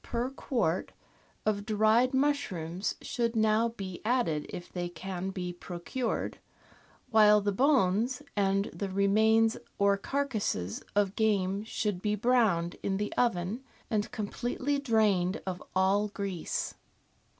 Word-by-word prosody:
per 240 +2 -2
quart 230 - -1 0.5
of 205 -1 +1
dried 220 +4 +3
mushrooms 215 - -1
should 235 -1 -1
now 220 +1 +3
be 195 -6 -7
added 215 -11 0
if 175 - -8
they 175 -1 -3
can 185 +2 -5
be 180 -2 -4
procured, 180 +8 -4 0.7
while 210 -1 +7
the 205 0 0
bones 250 +1 +2
and 195 -1 +2
the 200 - -4
remains 220 +3 +3 0.2
or 200 0 +3
carcases 215 - -2
of 205 -1 +2
game 200 -2 +1
should 210 -4 -2
be 210 0 +1
browned 210 -7 +2
in 195 -1 -1
the 210 +1 -2
oven 225 0 0 0.3
and 210 -1 0
com 210 -2 -3
pletely 280 +6 -2
drained 210 -7 +2
of 185 -1 -4
all 195 +2 +3
grease. 200 -4 -3
205 Hz, 130 wpm, -30 LUFS, 190-230 Hz, 0.7 s, while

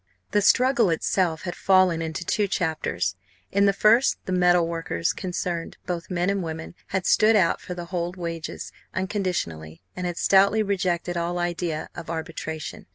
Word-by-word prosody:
The 205 - +3
struggle 245 -1 +4
itself 165 0 0
had 175 - -3
fallen 185 -3 +3
into 160 +1 -4
two 205 +3 +1
chapters. 155 - -1 0.4
In 200 +1 +3
the - - +5
first 215 +6 +4
the - - -4
metal 180 -2 +4
workers 165 0 -1
concerned, 175 -2 -4
both 175 -1 -4
men 180 -1 0
and 200 -1 -1
women, 160 -1 -6
had 190 -1 -2
stood 220 +1 +5
out 185 -5 +3
for 180 - -6
the 175 -1 -7
old 175 0 -2
wages 165 -2 -5 0.2
unconditionally 175 - -3
and 180 0 -3
had 175 -1 -4
stoutly 200 +3 +4
rejected 180 -3 -1
all 170 +1 -1
idea 175 -2 -2
of 165 -2 -8
arbitration. 160 -1 -5
175 Hz, 160 wpm, -25 LUFS, 165-190 Hz, 0.4 s, the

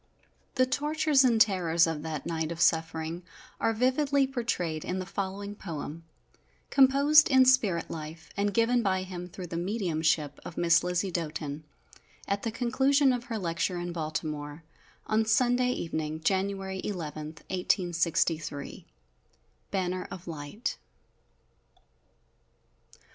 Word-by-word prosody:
The 255 - +4
tortures 295 +1 +2
and 235 -3 +3
terrors 175 -6 +4
of 160 -2 -3
that 155 -2 -5
night 160 -1 -2
of 170 - -6
suffering 160 0 +1 0.4
are 225 - +2
vividly 270 +4 +2
portrayed 225 - -2
in 180 - -3
the 185 - -3
following 195 +1 -4
poem, 165 -4 -7 0.7
composed 280 +3 +6
in 260 -2 +6
spirit 215 -10 +3
life, 160 +1 -8
and 205 0 0
given 230 +3 +3
by 190 -3 0
him 180 -1 -7
through 180 +1 -8
the 165 -1 -5
mediumship 165 -6 0
of 165 - -9
Miss 170 -1 +4
Lizzie 180 +2 -1
Doten, 155 -3 -4 0.6
at 200 0 -1
the 230 - -2
conclusion 265 +4 +2
of 245 -1 -3
her 230 -4 -3
lecture 175 -1 -1
in 175 0 -4
Baltimore, 155 -1 -4 0.4
on 220 +1 +2
Sunday 245 +3 +2
evening, 160 -8 -3
January 190 +1 -1
11, 155 -6 -4 0.2
1863." 170 -5 -1 0.8
_Banner 185 -1 -2
of 185 -1 -9
Light. 155 +7 -5
185 Hz, 125 wpm, -29 LUFS, 165-230 Hz, 0.8 s, composed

